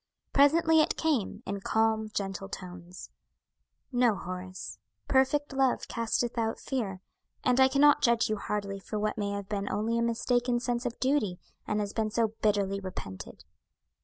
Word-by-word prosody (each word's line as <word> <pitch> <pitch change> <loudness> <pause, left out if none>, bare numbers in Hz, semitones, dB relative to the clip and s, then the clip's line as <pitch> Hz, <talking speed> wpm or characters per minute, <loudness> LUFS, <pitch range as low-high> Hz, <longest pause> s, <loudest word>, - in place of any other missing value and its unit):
Presently 320 +3 +5
it - - 0
came, 255 -8 0
in 200 +1 -3
calm, 220 +1 +1
gentle 195 -1 -4
tones; 180 -2 -9 0.8
"No, 245 -3 +3
Horace; 185 0 -7 0.3
'perfect 275 +2 +2
love 265 -2 +1
casteth 235 +1 -1
out 225 0 0
fear,' 205 -9 -3 0.4
and 250 0 +3
I 265 - +8
cannot 285 +2 +5
judge 235 -1 +3
you 215 - -1
hardly 200 -1 -3
for 210 +2 -5
what 210 0 -1
may 205 -1 -1
have 200 -1 -5
been 200 -1 -2
only 225 +3 0
a - - +1
mistaken 240 +1 +1
sense 245 0 -1
of 235 - -6
duty, 255 -9 +1 0.3
and 210 - 0
has 205 -1 -3
been 220 -1 0
so 225 +1 +1
bitterly 200 -2 +1
repented." 180 - -8
220 Hz, 160 wpm, -29 LUFS, 200-250 Hz, 0.8 s, I